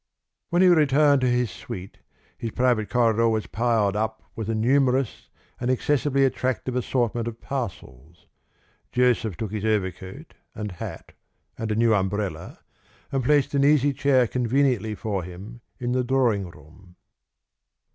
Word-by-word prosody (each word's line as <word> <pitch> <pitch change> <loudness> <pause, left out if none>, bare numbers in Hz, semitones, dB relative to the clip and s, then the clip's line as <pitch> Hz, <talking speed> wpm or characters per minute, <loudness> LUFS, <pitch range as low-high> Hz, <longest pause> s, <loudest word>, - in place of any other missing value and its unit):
When 175 +2 +3
he - - +6
returned 150 -4 +4
to 130 - +2
his 125 -3 +1
suite, 95 +1 -9 0.4
his 115 - -4
private 120 -2 +1
corridor 115 -2 +3
was 110 -1 -1
piled 110 -3 +1
up 110 +1 -2
with 110 -1 -4
a 115 - 0
numerous 130 +2 +1 0.3
and 120 - -2
excessively 140 +1 +2
attractive 130 -1 -1
assortment 120 -2 -1
of 115 -1 -6
parcels. 85 - -7 0.7
Joseph 120 -6 +1
took 105 0 -4
his 105 -1 -4
overcoat 105 - -3 0.2
and 105 -2 -5
hat 90 - -8 0.4
and 110 -1 -4
a - - 0
new 115 0 +3
umbrella, 100 0 -2 0.5
and 135 -2 0
placed 145 +2 +2
an 140 -1 +2
easy 145 -1 +4
chair 130 -2 +3
conveniently 125 -2 0
for 105 -3 -3
him 95 +7 -10 0.2
in 120 -1 -2
the 125 0 +1
drawing 120 -8 +1
room. 85 +4 -18
120 Hz, 145 wpm, -24 LUFS, 105-130 Hz, 0.7 s, he